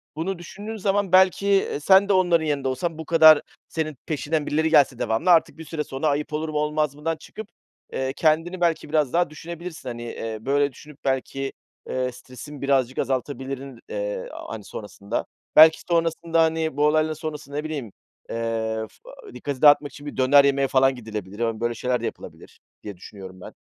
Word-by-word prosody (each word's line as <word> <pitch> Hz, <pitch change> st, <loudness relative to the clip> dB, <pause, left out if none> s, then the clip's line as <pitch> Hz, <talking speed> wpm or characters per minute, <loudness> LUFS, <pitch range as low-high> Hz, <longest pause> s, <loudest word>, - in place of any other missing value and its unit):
bunu 175 Hz, +3 st, -3 dB
düşündüğün 205 Hz, +5 st, -8 dB
zaman 200 Hz, -1 st, 0 dB
belki, 190 Hz, +1 st, +4 dB
eee, 195 Hz, -7 st, +2 dB
sen 195 Hz, +6 st, +5 dB
de -, -, +4 dB
onların 175 Hz, -4 st, +3 dB
yerinde 145 Hz, -3 st, -1 dB
olsan 155 Hz, +6 st, -2 dB
bu 160 Hz, -, -7 dB
kadar 160 Hz, -2 st, +7 dB, 0.3 s
senin 155 Hz, -3 st, -3 dB
peşinden 155 Hz, 0 st, -1 dB
birileri 160 Hz, +2 st, +1 dB
gelse 140 Hz, -6 st, +4 dB
devamlı 115 Hz, +11 st, 0 dB
artık 165 Hz, -1 st, +3 dB
bir 160 Hz, -, -9 dB
süre 150 Hz, 0 st, -3 dB
sonra 135 Hz, +2 st, -3 dB
ayıp 150 Hz, +1 st, -1 dB
olur 155 Hz, +1 st, -2 dB
mu, 150 Hz, -, -3 dB
olmaz 150 Hz, -1 st, 0 dB
mıdan 160 Hz, +2 st, -3 dB
çıkıp, 215 Hz, +6 st, -10 dB, 0.5 s
eee, 130 Hz, 0 st, -2 dB
kendini 165 Hz, +4 st, +1 dB
belki 170 Hz, -3 st, 0 dB
biraz 150 Hz, -3 st, +1 dB
daha 175 Hz, -1 st, +2 dB
düşünebilirsin. 170 Hz, -2 st, -8 dB
Hani, 120 Hz, -1 st, -6 dB
eee, 115 Hz, -1 st, -5 dB
böyle, 140 Hz, +2 st, +1 dB
düşünüp 150 Hz, +3 st, -14 dB
belki, 135 Hz, 0 st, -2 dB, 0.4 s
eee, 130 Hz, 0 st, -1 dB
stresin 130 Hz, +3 st, -11 dB
birazcık 135 Hz, -2 st, +1 dB
azaltabilirdin, 135 Hz, 0 st, -3 dB, 0.7 s
hani, 110 Hz, -2 st, -6 dB
sonrasında. 105 Hz, +1 st, -5 dB, 0.3 s
Belki 160 Hz, +1 st, +8 dB
sonrasında, 165 Hz, 0 st, +1 dB
hani, 160 Hz, -2 st, -1 dB
bu 150 Hz, -, +3 dB
olayların 155 Hz, +1 st, +2 dB
sonrası, 150 Hz, -2 st, -7 dB
ne 150 Hz, +1 st, -3 dB
bileyim, 145 Hz, -9 st, -5 dB, 0.4 s
eee, 115 Hz, -1 st, -2 dB
fı -, -, -15 dB
dikkati 140 Hz, -3 st, -5 dB
dağıtmak 145 Hz, -1 st, +6 dB
için 145 Hz, -, -12 dB
bir 145 Hz, -, -7 dB
döner 140 Hz, +2 st, +6 dB
yemeye 140 Hz, -1 st, +2 dB
falan 135 Hz, 0 st, +3 dB
gidilebilir. 105 Hz, -4 st, -7 dB
Hani, 115 Hz, -2 st, -1 dB
böyle 120 Hz, 0 st, -1 dB
şeyler 125 Hz, +1 st, -1 dB
de -, -, -3 dB
yapılabilir -, -, -9 dB, 0.2 s
diye 100 Hz, -3 st, -8 dB
düşünüyorum 95 Hz, 0 st, -11 dB
ben. -, -, -11 dB
150 Hz, 175 wpm, -24 LUFS, 130-160 Hz, 0.7 s, Belki